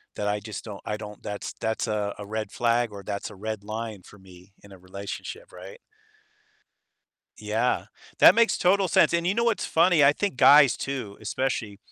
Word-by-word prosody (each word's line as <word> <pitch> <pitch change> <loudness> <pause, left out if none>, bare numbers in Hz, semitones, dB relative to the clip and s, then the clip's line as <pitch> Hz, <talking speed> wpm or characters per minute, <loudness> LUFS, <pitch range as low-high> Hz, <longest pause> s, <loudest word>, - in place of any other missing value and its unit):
that 105 - -3
I, 105 0 0
just, 110 +1 -8
don't 100 -3 -8
I 105 - -3
don't 105 -1 -10
that's 105 -1 -6
that's 110 +1 -2
a 105 -2 -2
a 105 - -7
red 110 0 -5
flag 120 -1 0
or 100 -1 -9
that's 100 -1 -5
a - - -12
red 110 +1 -5
line 110 -2 -6
for 105 - -16
me 95 +1 -17
in 100 - -16
a 95 - -12
relationship, 100 - -8
right?" 485 0 -11 1.6
Yeah. - - -1 0.3
That - - +9
makes 230 0 +3
total 190 +1 +2
sense, - - +4
and, 170 0 0
you 190 - +1
know, 235 +1 +1
what's 230 -3 0
funny? 165 -3 +4
I 140 - +6
think 200 +4 -3
guys 145 -3 +7
too, 130 -8 -5
especially 110 -2 -3
110 Hz, 190 wpm, -25 LUFS, 100-150 Hz, 1.6 s, That